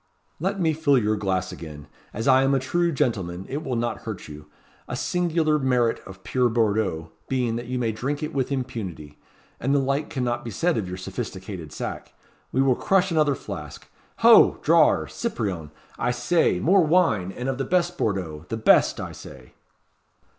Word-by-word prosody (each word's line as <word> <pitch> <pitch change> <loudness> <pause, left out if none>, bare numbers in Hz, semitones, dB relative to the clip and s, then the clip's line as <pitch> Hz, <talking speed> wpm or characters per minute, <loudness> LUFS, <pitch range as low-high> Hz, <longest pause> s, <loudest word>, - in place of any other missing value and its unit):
"Let 195 +5 -1
me 160 -3 +2
fill 150 -3 +3
your 110 -2 +1
glass 95 -2 -1
again. 75 -3 -9 0.3
As 110 +4 -4
I 130 -1 +6
am 135 +1 +3
a - - +2
true 170 +6 0
gentleman, 95 - -1
it 145 +4 -4
will 130 -4 -2
not 120 0 -2
hurt 110 -5 -7
you; 75 0 -11 0.4
a - - -4
singular 165 -3 +1
merit 125 -4 +1
of 95 0 -12
pure 125 -2 +1
Bordeaux 105 -8 0 0.2
being 125 -3 0
that 120 - -6
you 125 +1 -2
may 115 -2 0
drink 140 +7 -3
it 150 - -4
with 135 -1 -1
impunity; 100 - -5 0.4
and 135 +4 +1
the - - +4
like 140 +2 -1
cannot 120 -3 -2
be 120 - -5
said 170 - 0
of 105 -5 -2
your 90 0 -5
sophisticated 95 - -6
sack. - - -6 0.4
We 130 - +2
will 135 -1 +4
crush 190 +7 +1
another 150 -3 +2
flask. - - -8 0.4
Ho! - - +8
drawer - - +4
Cyprien, 90 -8 -3 0.3
I - - 0
say! 125 +8 +2
More 190 +3 +4
wine 155 - +2
and 125 +6 -5
of 135 0 -2
the - - +1
best 175 +2 +1
Bordeaux. 90 -6 -2
The 115 - -2
best, 110 - +4
I - - -5
say." 65 -2 -12
125 Hz, 180 wpm, -24 LUFS, 95-145 Hz, 0.4 s, Ho